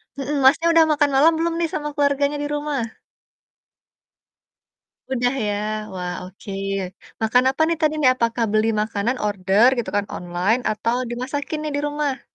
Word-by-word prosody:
Nah 275 - -5
heeh, 295 - -1
Masnya, 285 +5 +5
udah 330 -1 +6
makan 295 -1 +3
malam 300 +5 +6
belum 335 +1 0
nih, 335 -1 0
sama 295 -1 -2
keluarganya 285 0 +1
di - - -2
rumah? 295 -1 -2 2.4
Udah, 245 0 +1
ya? 205 - 0 0.4
Wah, 180 -1 -4
oke. 190 +2 -10 0.7
Makan 235 +3 +3
apa 270 +4 -1
nih, 335 0 0
tadi 310 -1 +2
nih? 260 -4 +6
Apakah 230 -1 0
beli 215 +1 +2
makanan, 215 +3 -1
order, 200 +2 +3
gitu 240 - -2
kan, 205 - +1
online 180 +7 0
atau, 230 +2 -1
dimasakin 270 +5 -4
nih, 305 - -2
di - - 0
rumah? 290 -2 -2
260 Hz, 160 wpm, -22 LUFS, 215-295 Hz, 2.4 s, udah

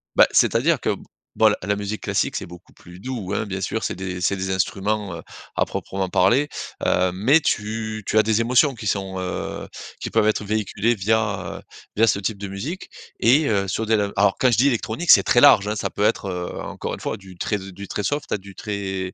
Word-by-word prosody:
Bah, - - +7
c'est-à-dire - - +3
que, - - 0 0.4
bon, - - +5
la 100 +3 0
musique 105 +1 -4
classique, - - -1
c'est - - -3
beaucoup 90 +1 -14
plus 90 +1 -14
doux, 110 -5 -5
hein, 110 - -1
bien 95 -1 -5
sûr. 110 +4 -2
C'est - - -2
des 90 -1 -5
c'est 100 - +1
des 95 0 -3
instruments, 95 0 -1
heu, - - -8 0.3
à - - +2
proprement 95 -1 -4
parler. 125 +13 +3 0.4
Heu, 90 0 +2
mais 125 - +4
tu 110 -3 -2
tu 110 - 0
as 110 - +6
des 110 +1 +2
émotions 125 +4 +3
qui 110 -3 -7
sont, 95 -1 -2
heu, 90 0 -4 0.3
qui - - -4
peuvent 105 - +2
être 105 -1 +1
véhiculées 110 +2 0
via, 105 0 -1
heu, - - -14 0.3
via 115 +2 +4
ce 100 - +2
type 100 +1 -2
de 100 - -6
musique 120 - -6 0.3
et 140 +6 +4
heu, 100 -2 +1
sur 110 +4 -2
de 110 - +1
la 100 -2 +1
alors, 100 0 +3
quand 130 - +4
je - - +2
dis 135 +4 +5
électronique, 125 +6 +1
c'est - - +8
très 120 - +4
large, 100 0 +7
hein. 105 - -1
Ça - - -2
peut 105 - -3
être, 105 - +1
heu, 90 -1 -4
encore - - -5
une - - -13
fois, - - -3
du 95 -2 -14
très 105 - -1
du 95 +1 -9
très 105 - -3
soft 145 +6 -2
à - - +1
du 100 0 -13
très 95 -3 -4
105 Hz, 230 wpm, -22 LUFS, 95-110 Hz, 0.4 s, c'est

